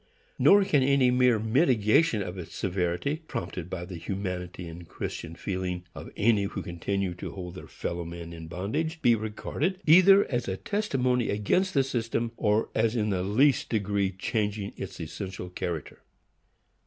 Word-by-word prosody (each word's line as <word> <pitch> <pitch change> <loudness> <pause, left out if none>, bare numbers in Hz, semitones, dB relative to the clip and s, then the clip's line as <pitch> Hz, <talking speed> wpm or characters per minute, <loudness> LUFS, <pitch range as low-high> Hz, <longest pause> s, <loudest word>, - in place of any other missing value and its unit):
Nor 200 0 +7
can 150 -7 +3
any 130 -1 +4
mere 125 -2 +4
mitigation 110 - +3
of 90 0 -6
its 90 -4 -8
severity, 95 - -1
prompted 90 0 -5
by 90 -2 -4
the 90 -1 -7
humanity 90 0 -4
and 85 +1 -9
Christian 80 +1 -6
feeling 90 -2 -3
of - - -8
any 105 -2 +3
who 100 -1 -4
continue 90 +2 -2
to 90 - -7
hold 90 -2 -7
their 90 - -10
fellow 85 0 -4
men 85 0 -8
in 80 -1 -8
bondage, 110 - -3
be 120 -2 +6
regarded 115 - -2
either 185 +5 +7
as 120 -2 -2
a 95 0 -2
testimony 130 - 0
against 180 - +1
the 135 - +5
system, 115 -2 -2
or 105 0 +1
as 110 +1 +1
in 105 -2 +1
the 95 -2 0
least 125 +9 +3
degree 100 -3 0
changing 105 +1 -2
its - - -7
essential 90 +2 -6
character. 85 -3 -5
105 Hz, 160 wpm, -28 LUFS, 90-125 Hz, -, Nor